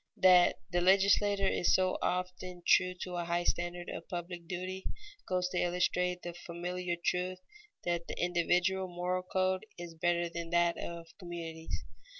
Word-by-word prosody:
_ - - -22
That 180 -1 +7 0.2
the 175 - +2
legislator 195 +1 +4
is 175 - +3
so 185 0 +2
often 180 0 -2
true 180 0 +4
to 180 -1 -4
a 175 - -2
high 170 +1 0
standard 175 0 -1
of - - -7
public 175 -1 -5
duty, 185 +1 -4 0.4
goes 180 -1 +1
to 180 - -1
illustrate 180 0 +1
the 175 - -5
familiar 175 +1 -4
truth 180 +2 -1 0.5
that 170 -1 -1
the - - -5
individual 180 +2 +2
moral 180 +1 -1
code 185 +1 0
is 175 -1 -7
better 175 +1 +1
than 170 0 -5
that 170 0 +3
of 170 -1 -7
communities. 165 -3 -6
180 Hz, 155 wpm, -32 LUFS, 175-185 Hz, 0.5 s, That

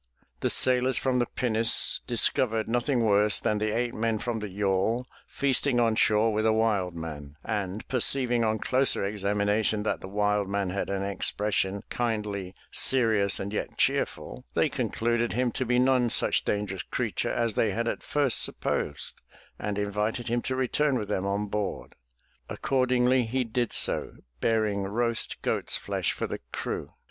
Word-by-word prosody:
The - - 0
sailors 130 0 +4
from 130 -1 +1
the 120 - +1
pinnace 115 -2 +2
discovered 115 -2 +1
nothing 120 +2 0
worse 105 0 +4
than 105 -1 0
the 110 0 0
eight 120 +2 -1
men 115 0 0
from 115 +1 -3
the 105 -1 -5
yawl 100 +5 0 0.2
feasting 140 -2 0
on 115 -2 +3
shore 110 0 +3
with 110 +1 0
a 110 - +4
wild 105 -5 +1
man, 75 -3 -7
and, 105 -2 -3
perceiving 125 -1 +2
on 110 0 +1
closer 130 0 +2
examination 105 +1 0
that 110 - -2
the - - -7
wild 105 0 0
man 100 -2 -1
had 100 - -3
an 100 0 -2
expression 100 0 -1
kindly, 105 -5 -2 0.2
serious, 110 -6 +3
and 100 +2 -5
yet - - -4
cheerful, - - -1
they - - +3
concluded 120 +1 -1
him 125 +1 0
to 130 +2 -3
be 125 +1 +2
none 125 -1 +3
such - - +2
dangerous 100 -3 -2
creature - - -2
as 115 -2 0
they 110 - +1
had 115 +4 -2
at - - -2
first 145 -5 +2
sup - - -1
posed 75 - -2 0.4
and 105 -1 -3
invited 105 +3 -2
him 120 +1 0
to 130 - -3
return 130 +2 +1
with 105 -4 -4
them 95 +1 -1
on 100 +1 -1
board. 105 0 -4 0.6
According 130 -2 +1
ly, 130 +1 +4
he 125 +2 0
did 120 0 -2
so, - - +1 0.3
bearing 110 - +1
roast 115 +4 0
goat's - - +1
flesh - - -2
for - - -3
the - - -5
crew. - - -4
110 Hz, 170 wpm, -27 LUFS, 100-120 Hz, 0.6 s, sailors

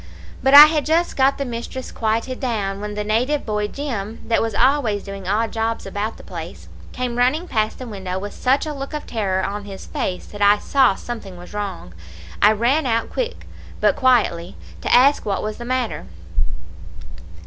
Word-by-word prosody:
"But 270 +2 +5
I 295 +1 +14
had 305 -1 +1
just 330 +2 +1
got 270 +1 +3
the 280 - -2
mistress 240 +2 -6
quieted 230 +3 -1
down, 205 -6 -2
when 210 0 -5
the 210 - -2
native 245 +8 0
boy 210 -1 -1
Jim, 225 -5 -5
that 230 - +2
was 225 -2 -2
always 245 -5 +2
doing 195 -2 -8
odd 220 +3 0
jobs 225 0 -2
about 205 +3 -3
the - - -13
place, - - -8 0.2
came 245 -1 -3
running 300 +8 +2
past 215 -5 -1
the 255 - -7
window 190 -5 -5
with 205 +2 -5
such 265 +4 +1
a 305 - -4
look 275 +1 -6
of 300 - -5
terror 190 -5 -1
on 205 +1 -4
his 195 -1 -9
face 180 -1 -3
that 205 - -10
I 205 +1 +6
saw 260 -2 +3
something 200 -5 -7
was 175 +3 -12
wrong. 195 - -5 0.5
I 210 - +7
ran 255 +7 +1
out 230 -1 0
quick - - -3 0.3
but - - +3
quietly, 225 -10 +2 0.3
to - - -2
ask 275 +4 +5
what 200 -2 -2
was 215 0 -4
the 240 - -7
matter. 245 - -2
225 Hz, 190 wpm, -21 LUFS, 205-260 Hz, 0.5 s, I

